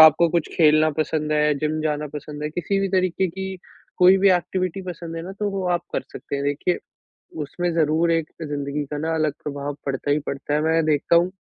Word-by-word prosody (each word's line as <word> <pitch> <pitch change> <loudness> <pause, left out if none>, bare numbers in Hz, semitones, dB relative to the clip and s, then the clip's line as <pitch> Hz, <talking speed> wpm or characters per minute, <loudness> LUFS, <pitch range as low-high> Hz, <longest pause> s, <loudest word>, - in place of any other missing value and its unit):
आपको 160 +2 +8
कुछ 170 -1 0
खेलना 155 -1 +5
पसंद 155 0 0
है, 150 0 +3
जिम 155 +1 -1
जाना 150 -1 -1
पसंद 150 0 -6
है 150 - -1
किसी 175 +5 -1
भी 195 - 0
तरीके 185 0 +1
की 190 +2 -5 0.4
कोई 185 +1 +7
भी 195 0 +5
एक्टिविटी 185 +1 0
पसंद 170 -1 -6
है 165 - -4
ना, 190 +2 -7
तो 205 +1 -2
वो 195 -1 -3
आप - - -7
कर - - -1
सकते 140 - -5
हैं 140 - -3
देखिए। 145 +5 0 0.7
उसमें 175 +4 -2
ज़रूर 160 +1 +2
एक 165 -2 0
ज़िंदगी 145 -1 -3
का 150 - -2
ना 160 +2 -1
अलग 155 -2 +1
प्रभाव 145 -1 -4
पड़ता 135 +1 -1
ही 150 - +3
पड़ता 140 +1 -3
है, 150 - +2
मैं 160 0 +3
देखता 155 +2 +2
हूँ, 175 +2 +4
160 Hz, 215 wpm, -23 LUFS, 150-175 Hz, 0.7 s, आपको